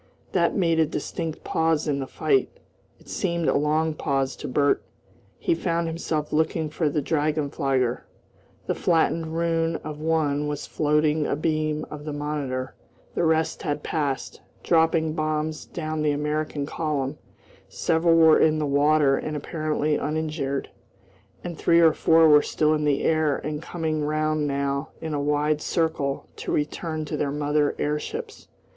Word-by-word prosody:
That 170 -2 +2
made 165 -4 +2
a 160 - +4
distinct 160 +2 -4
pause 160 -1 +1
in 140 -2 0
the 135 - -4
fight. 400 - +1 0.5
It - - -22
seemed 170 -4 -1
a - - +3
long 155 +2 +1
pause 135 -3 -1
to - - -6
Bert. 145 +2 +2 0.6
He 345 - +1
found 170 - -1
himself 160 -2 -3
looking 160 0 0
for 155 0 0
the 145 0 -1
drachenflieger. 145 -5 0 0.7
The - - 0
flattened 165 -1 +1
ruin 165 -1 +1
of 150 0 -6
one 150 -2 0
was 150 -1 -4
floating 150 0 +1
abeam 155 0 -1
of 150 0 -8
the 150 - -4
Monitor, 145 -3 -3 0.4
the - - 0
rest 160 0 +1
had 145 -1 -2
passed, 145 -4 -2 0.2
dropping 160 -1 +2
bombs 155 0 -2
down 155 -2 -4
the 150 - +2
American 150 0 -2
column; 150 -2 -2 0.5
several 165 +1 +2
were 160 -1 +6
in 155 0 +4
the 155 - 0
water 145 0 +3
and 155 -1 -3
apparently 155 -1 -1
uninjured, 150 -2 -2 0.7
and 170 -3 -6
three 170 0 +4
or 165 -2 +6
four 165 +1 +5
were 150 -1 +7
still 155 +1 +1
in 150 -1 0
the 145 -1 +1
air 155 -3 +2
and 150 +1 -4
coming 160 -3 -2
round 155 0 0
now 140 0 -1
in 160 -1 -4
a 145 - -1
wide 150 +1 +1
circle 160 -5 -1
to - - -4
return 155 +1 -2
to - - -4
their 145 - -1
mother 145 0 +1
airships. 430 - -4
155 Hz, 155 wpm, -25 LUFS, 145-160 Hz, 0.7 s, were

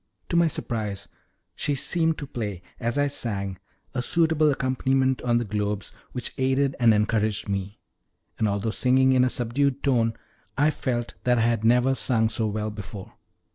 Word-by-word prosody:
To - - -1
my 170 0 +5
surprise 105 -9 -3 0.5
she 145 -2 -1
seemed 160 +3 +1
to 145 - -5
play 105 -8 -5 0.2
as 120 +3 -1
I 145 - +3
sang 100 -9 -2 0.3
a 125 - -1
suitable 160 +2 +3
accompaniment 130 -1 +1
on 120 -1 +2
the 120 - -1
globes, 105 -1 -2 0.2
which 125 -2 -4
aided 135 +1 +1
and 120 -2 +6
encouraged 105 0 +1
me, 100 0 -3 0.6
and, 110 - +2
although 100 +2 -1
singing 130 +3 +3
in 130 -1 +4
a 125 - +3
subdued 130 +3 0
tone, 115 -5 +2 0.4
I 150 +2 +4
felt 120 -5 -3
that 125 -1 +3
I - - +2
had 115 -1 +1
never 125 +3 +4
sung 115 -4 +2
so 110 0 0
well 105 0 -2
before. 100 -2 -9
120 Hz, 170 wpm, -25 LUFS, 105-135 Hz, 0.6 s, and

